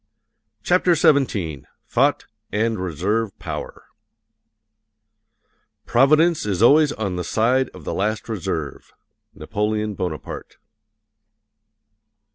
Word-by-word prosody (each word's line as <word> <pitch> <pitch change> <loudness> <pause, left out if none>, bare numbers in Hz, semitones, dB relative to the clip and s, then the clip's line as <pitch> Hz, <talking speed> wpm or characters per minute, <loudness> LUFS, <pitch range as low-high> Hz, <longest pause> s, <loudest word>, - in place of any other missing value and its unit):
CHAPTER 180 -1 +3
XVII 105 - +1 0.3
THOUGHT - - +2 0.3
AND 110 0 0
RESERVE 95 +5 -2
POWER - - -7 2.0
Providence 155 +6 +4
is 100 0 -1
always 150 +4 +6
on 100 -5 -3
the 90 - -2
side 125 +7 +1
of - - -13
the - - -4
last 105 +2 -2
reserve. 90 - -4 0.4
NAPOLEON 105 0 -2
BONAPARTE. 90 -6 -6
110 Hz, 85 wpm, -22 LUFS, 95-130 Hz, 2.0 s, always